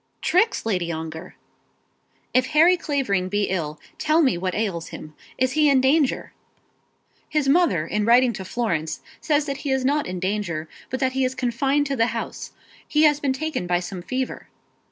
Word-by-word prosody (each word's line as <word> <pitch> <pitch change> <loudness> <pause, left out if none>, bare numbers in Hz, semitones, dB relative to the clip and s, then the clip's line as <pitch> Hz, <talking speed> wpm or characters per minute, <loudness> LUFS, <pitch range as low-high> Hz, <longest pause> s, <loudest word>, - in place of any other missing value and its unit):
"Tricks, 370 - +2
Lady 180 -6 -1
Ongar!" 160 +2 -6 1.0
"If 255 0 +3
Harry 325 +4 +5
Clavering 255 - -1
be 205 +1 0
ill, 155 -5 -3 0.2
tell 315 +2 +3
me 260 - +3
what 185 +1 -2
ails 195 -6 -2
him. 155 0 -9 0.2
Is 255 0 +1
he 305 +1 +3
in 275 -2 +5
danger?" 270 +2 +1 1.0
"His 300 -3 0
mother 275 - +3
in 210 +5 -1
writing 240 +2 +5
to 190 - -6
Florence 185 -7 -2 0.2
says 295 -1 +1
that 275 -2 -3
he 285 - -5
is 265 -1 +1
not 290 +2 +1
in 180 0 -4
danger; 185 -4 -2 0.2
but 260 - -3
that 260 -1 +2
he 265 +1 0
is 255 0 -1
confined 270 +4 +1
to 275 -1 -2
the 230 -2 +2
house. - - -6 0.4
He 305 0 +2
has 295 -2 +5
been 280 -2 0
taken 305 - -3
by 175 0 +2
some 180 0 -6
fever." 255 +7 -4
255 Hz, 180 wpm, -23 LUFS, 185-285 Hz, 1.0 s, Harry